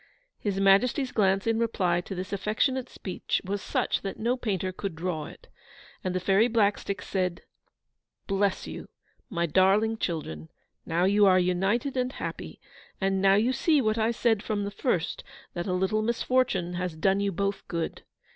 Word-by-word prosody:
His 200 Hz, -2 st, -2 dB
Majesty's 240 Hz, +8 st, +3 dB
glance 195 Hz, -2 st, +2 dB
in 225 Hz, 0 st, +1 dB
reply 185 Hz, -7 st, +1 dB
to 190 Hz, -, -7 dB
this 185 Hz, +2 st, -5 dB
affectionate 240 Hz, +6 st, 0 dB
speech 185 Hz, -, -3 dB
was 200 Hz, +1 st, -2 dB
such -, -, -1 dB
that 195 Hz, -, -5 dB
no 235 Hz, +3 st, +1 dB
painter 195 Hz, -7 st, -2 dB
could 190 Hz, -1 st, -5 dB
draw 160 Hz, -2 st, -3 dB
it. -, -, -14 dB, 0.6 s
And 185 Hz, -1 st, -2 dB
the -, -, +1 dB
Fairy 195 Hz, +5 st, +3 dB
Blackstick 205 Hz, -3 st, 0 dB
said, 180 Hz, -3 st, -2 dB, 0.8 s
'Bless 195 Hz, -1 st, 0 dB
you, -, -, -8 dB, 0.4 s
my 170 Hz, -6 st, 0 dB
darling 195 Hz, +6 st, +3 dB
children! 80 Hz, -, -4 dB, 0.4 s
Now 170 Hz, +2 st, +1 dB
you 200 Hz, +2 st, +5 dB
are 185 Hz, -1 st, +6 dB
united 195 Hz, +9 st, +1 dB
and 255 Hz, 0 st, -1 dB
happy; -, -, -6 dB, 0.4 s
and 195 Hz, 0 st, +1 dB
now 195 Hz, 0 st, +5 dB
you 230 Hz, +5 st, +2 dB
see 310 Hz, +2 st, +3 dB
what 220 Hz, -3 st, +1 dB
I 220 Hz, +1 st, +2 dB
said 230 Hz, -2 st, +1 dB
from 210 Hz, -2 st, -2 dB
the 200 Hz, -, -3 dB
first, 190 Hz, -, -1 dB, 0.3 s
that 175 Hz, 0 st, -4 dB
a 185 Hz, -, 0 dB
little 190 Hz, +4 st, +1 dB
misfortune 230 Hz, -5 st, 0 dB
has 180 Hz, -2 st, -3 dB
done 190 Hz, +5 st, +2 dB
you 200 Hz, 0 st, 0 dB
both 200 Hz, +2 st, -2 dB
good. 170 Hz, -1 st, -3 dB
195 Hz, 170 wpm, -27 LUFS, 185-220 Hz, 0.8 s, are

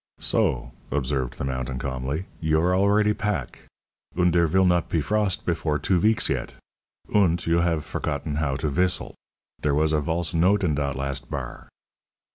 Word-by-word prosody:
"So," -, -, 0 dB, 0.2 s
observed 65 Hz, -2 st, -1 dB
the -, -, -4 dB
mountain 65 Hz, -1 st, -3 dB
calmly, 65 Hz, +6 st, -3 dB
"You 80 Hz, -1 st, +2 dB
are 90 Hz, +2 st, +2 dB
already 105 Hz, +2 st, +3 dB
pack. 105 Hz, -, -3 dB, 0.5 s
Und 90 Hz, -2 st, +3 dB
dere 85 Hz, -1 st, +4 dB
vill 95 Hz, +4 st, +3 dB
not 90 Hz, -1 st, +2 dB
pe 85 Hz, -, +1 dB
frost 105 Hz, +3 st, 0 dB
before 80 Hz, -3 st, 0 dB
two 90 Hz, +5 st, +1 dB
veeks 110 Hz, +4 st, +2 dB
yet! -, -, -3 dB, 0.6 s
Und 85 Hz, -5 st, +3 dB
you 85 Hz, +1 st, +2 dB
haf 85 Hz, -3 st, +1 dB
forgotten 75 Hz, 0 st, -3 dB
how 70 Hz, -3 st, 0 dB
to 75 Hz, -, -2 dB
vistle. 90 Hz, +6 st, 0 dB, 0.5 s
Dere 70 Hz, -1 st, +1 dB
was 80 Hz, +1 st, +2 dB
a 75 Hz, -, +2 dB
valse 80 Hz, +3 st, -1 dB
note 95 Hz, +5 st, +3 dB
in 80 Hz, -4 st, +2 dB
dot 70 Hz, -2 st, -1 dB
last 70 Hz, 0 st, -3 dB
bar." -, -, -6 dB
80 Hz, 170 wpm, -25 LUFS, 70-90 Hz, 0.6 s, dere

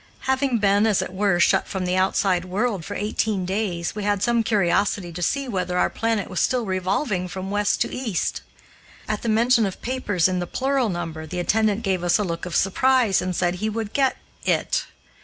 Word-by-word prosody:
Having 265 Hz, -1 st, +1 dB
been, 205 Hz, 0 st, +3 dB
as 210 Hz, -3 st, +2 dB
it -, -, -8 dB
were, 195 Hz, -2 st, +1 dB
shut -, -, +3 dB
from 190 Hz, -2 st, -3 dB
the 180 Hz, 0 st, 0 dB
outside 185 Hz, -1 st, +2 dB
world 200 Hz, 0 st, -1 dB
for 205 Hz, -, -6 dB
eighteen 210 Hz, -2 st, -1 dB
days, 185 Hz, -3 st, -2 dB
we 210 Hz, -, -5 dB
had 205 Hz, -1 st, 0 dB
some 235 Hz, 0 st, +2 dB
curiosity 200 Hz, -3 st, +1 dB
to 175 Hz, -, -6 dB
see 275 Hz, -, 0 dB
whether 180 Hz, -5 st, -2 dB
our -, -, +2 dB
planet 225 Hz, -2 st, -1 dB
was 185 Hz, -3 st, -3 dB
still 245 Hz, +6 st, +1 dB
revolving 185 Hz, +1 st, -1 dB
from 190 Hz, +1 st, -6 dB
west 205 Hz, 0 st, +1 dB
to -, -, 0 dB
east. 235 Hz, -8 st, -2 dB, 0.7 s
At 215 Hz, -1 st, -2 dB
the 235 Hz, -, -2 dB
mention 230 Hz, +2 st, +4 dB
of 195 Hz, -3 st, -3 dB
papers 210 Hz, -9 st, +1 dB
in 185 Hz, -1 st, -1 dB
the 175 Hz, -, -3 dB
plural 265 Hz, 0 st, 0 dB
number, 165 Hz, -3 st, -5 dB
the 180 Hz, -, -6 dB
attendant 215 Hz, +4 st, +1 dB
gave 190 Hz, -4 st, 0 dB
us 175 Hz, -1 st, +3 dB
a 210 Hz, -, 0 dB
look 170 Hz, -1 st, -4 dB
of 175 Hz, -, -5 dB
surprise, 240 Hz, +1 st, +3 dB
and 185 Hz, 0 st, -2 dB
said 175 Hz, +1 st, 0 dB
he 215 Hz, -, 0 dB
would 220 Hz, -1 st, -4 dB
get 270 Hz, -2 st, +2 dB, 0.3 s
"it." -, -, 0 dB
200 Hz, 205 wpm, -23 LUFS, 180-225 Hz, 0.7 s, mention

